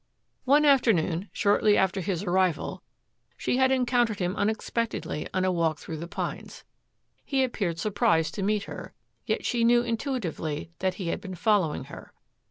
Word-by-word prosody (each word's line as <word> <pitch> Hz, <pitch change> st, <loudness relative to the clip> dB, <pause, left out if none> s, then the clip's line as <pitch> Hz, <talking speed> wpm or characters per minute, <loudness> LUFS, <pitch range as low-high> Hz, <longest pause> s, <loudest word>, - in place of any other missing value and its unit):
One 290 Hz, +3 st, +5 dB
afternoon, 205 Hz, -, +3 dB
shortly 205 Hz, 0 st, +3 dB
after 190 Hz, 0 st, +1 dB
his 185 Hz, 0 st, -2 dB
arrival, 185 Hz, -3 st, 0 dB, 0.6 s
she -, -, 0 dB
had 260 Hz, 0 st, +4 dB
encountered 245 Hz, -4 st, +2 dB
him 180 Hz, -1 st, -1 dB
unexpectedly 220 Hz, -5 st, -2 dB
on 185 Hz, 0 st, 0 dB
a 185 Hz, -, +2 dB
walk 165 Hz, -3 st, +1 dB
through 160 Hz, +1 st, -7 dB
the 170 Hz, +3 st, -6 dB
pines. 180 Hz, -, -5 dB, 0.6 s
He 270 Hz, -2 st, +1 dB
appeared 195 Hz, -9 st, -2 dB
surprised 190 Hz, -4 st, +1 dB
to 205 Hz, -, -4 dB
meet 205 Hz, +1 st, +1 dB
her, -, -, -9 dB, 0.3 s
yet -, -, -1 dB
she 235 Hz, -1 st, +1 dB
knew 240 Hz, +1 st, +5 dB
intuitively 220 Hz, -, -3 dB
that 185 Hz, -1 st, 0 dB
he 185 Hz, -4 st, -4 dB
had -, -, -2 dB
been 190 Hz, -2 st, -7 dB
following 190 Hz, -4 st, +1 dB
her. -, -, -11 dB
200 Hz, 160 wpm, -27 LUFS, 175-235 Hz, 0.6 s, One